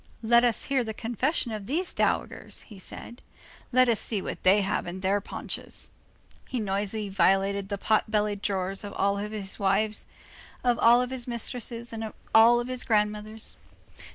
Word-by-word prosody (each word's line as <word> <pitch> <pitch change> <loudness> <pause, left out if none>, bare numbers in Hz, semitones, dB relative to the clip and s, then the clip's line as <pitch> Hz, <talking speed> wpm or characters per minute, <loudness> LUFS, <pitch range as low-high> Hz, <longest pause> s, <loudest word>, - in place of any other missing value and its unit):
—"Let 235 +2 +5
us 240 -3 +2
hear 270 -2 +1
the 220 -2 -5
confession 240 - -1
of 210 -2 -5
these 345 +7 -1
dowagers," - - -1
he 210 -5 -13
said, 235 +5 -7 0.5
"let 255 0 +5
us 230 -3 +2
see 215 - 0
what - - -5
they 195 +3 +5
have 195 -2 -1
in 180 +2 -6
their 195 +2 +1
paunches." - - -5 0.6
He 255 - -2
noisily 205 +1 -2
violated 195 +1 +2
the 200 - -2
pot 215 +2 +1
bellied 210 -1 0
drawers 195 0 -1
of 205 - -7
all 200 0 +1
his 205 -1 -5
wives, 205 +2 +1 0.6
of 245 -2 +2
all 240 +2 +6
his 255 -1 -5
mistresses 235 0 -2
and 225 0 -4
of 220 - -6 0.2
all 235 +2 +7
his 255 0 -3
grandmothers. 215 0 0
215 Hz, 165 wpm, -27 LUFS, 200-235 Hz, 0.6 s, all